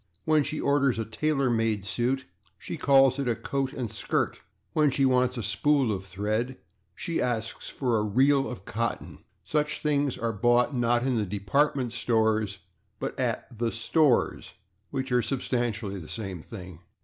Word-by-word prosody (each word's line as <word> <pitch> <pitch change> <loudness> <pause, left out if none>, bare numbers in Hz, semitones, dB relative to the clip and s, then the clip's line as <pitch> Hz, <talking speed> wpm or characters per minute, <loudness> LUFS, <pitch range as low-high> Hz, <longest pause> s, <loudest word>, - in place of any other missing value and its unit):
When 155 -1 +4
she 155 - -3
orders 140 -3 +2
a 115 - -2
/tailor 135 +2 0
made 110 -3 0
suit/, 125 +5 -1 0.3
she - - -6
calls 135 -3 +4
it 135 -3 0
a 115 - +1
/coat 135 +2 -2
and 120 -6 -5
skirt/. - - -1 0.3
When 150 -2 +4
she 135 0 +2
wants 125 -1 +2
a - - -2
/spool 130 +3 +2
of 95 -1 -5
thread/ 105 +7 -2 0.4
she 170 - -2
asks 115 -2 -2
for 120 -5 0
a - - 0
/reel 135 +6 +3
of 100 -6 -9
cotton/. 115 +2 -3 0.2
Such 150 0 -1
things 145 -3 +1
are 115 0 -1
bought, 120 +5 +3
not 120 -1 +2
in 130 -3 +1
the 105 -1 -2
/department 135 +4 +1
stores/, 110 -4 +1 0.4
but - - -4
at - - -2
the 115 +1 0
/stores/, 125 +4 +1 0.4
which 135 -1 -3
are 125 0 +4
substantially 115 -5 -2
the 80 - -10
same 95 -6 -5
thing. 90 -4 -10
120 Hz, 165 wpm, -27 LUFS, 110-135 Hz, 0.4 s, When